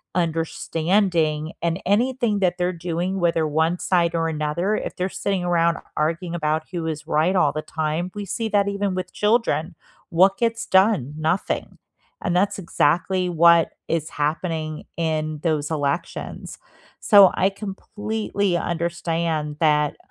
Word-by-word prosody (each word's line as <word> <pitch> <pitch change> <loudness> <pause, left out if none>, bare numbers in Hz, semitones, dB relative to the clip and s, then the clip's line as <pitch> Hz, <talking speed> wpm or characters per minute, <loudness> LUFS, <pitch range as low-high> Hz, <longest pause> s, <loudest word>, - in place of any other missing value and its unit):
understanding 165 -1 0
and 170 +1 -1
anything 230 +1 +1
that 180 -2 +1
they're 180 0 0
doing, 175 +2 -3
whether 165 -2 +1
1 160 +3 +1
side 170 -2 +1
or 165 -1 +1
another, 160 +6 -1
if - - -4
they're 185 +1 -2
sitting 195 -1 -2
around 170 -1 +2 0.2
arguing 165 +3 -1
about 155 -1 0
who 170 -3 -3
is 155 -1 -4
right 165 +4 +1
all 150 -6 +3
the 155 - -3
time, 160 +3 -2
we 205 -1 -4
see 225 +4 -3
that 205 -1 +2
even 200 -1 -1
with 185 0 -5
children. 210 -7 +1 0.3
What 190 +3 +4
gets 230 -1 -1
done? 190 - +3
Nothing. 160 +4 -2 0.5
And 180 -3 0
that's 195 +3 +2
exactly 180 +1 +1
what 170 0 +5
is 160 -2 -1
happening 155 +1 -3
in 155 -2 -2
those 155 -3 0
elections. 150 +1 -3 0.4
So, 200 -3 +7
I 190 - +3
completely 205 -1 -3
understand 165 -3 -2
that 150 -2 +2
170 Hz, 140 wpm, -23 LUFS, 160-190 Hz, 0.5 s, So